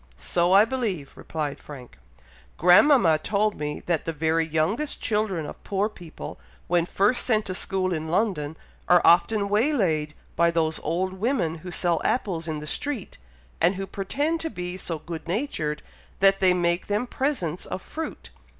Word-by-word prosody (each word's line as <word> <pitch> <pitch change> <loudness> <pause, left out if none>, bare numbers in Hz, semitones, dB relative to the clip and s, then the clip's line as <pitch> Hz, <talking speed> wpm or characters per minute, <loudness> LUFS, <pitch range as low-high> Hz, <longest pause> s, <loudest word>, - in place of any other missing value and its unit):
"So 170 - +1
I 200 +3 +7
believe," 220 - -3
replied 150 -3 -4
Frank. 125 - -12 0.6
"Grandmama 180 - +6
told 210 +5 +1
me 150 0 -3
that 170 -3 -1
the 165 - -1
very 160 +1 +1
youngest 170 - 0
children 210 -7 0
of - - -9
poor 200 +2 0
people, 175 -6 -10 0.3
when 175 -1 +2
first 205 +7 +2
sent 220 -3 +1
to 185 - -3
school 185 0 -1
in 160 -1 -3
London, 160 -5 -1 0.3
are 175 -1 +6
often 200 +4 +4
waylaid 200 - +1 0.2
by 170 0 +4
those 160 -1 0
old 185 +4 -1
women 190 - -1
who 180 - -8
sell 175 -1 0
apples 175 -9 -1
in 155 -1 -2
the 150 - -7
street, 245 - -4 0.4
and 175 +4 +4
who 195 +1 -4
pretend 285 +13 -2
to 325 - -3
be 180 - -5
so 175 -3 -4
good 165 +1 -8
natured 170 - -2 0.4
that 195 0 +5
they 185 -1 +5
make 175 -1 +1
them 210 +4 0
presents 240 - -2
of - - -4
fruit. 320 0 -7
180 Hz, 165 wpm, -25 LUFS, 160-210 Hz, 0.6 s, I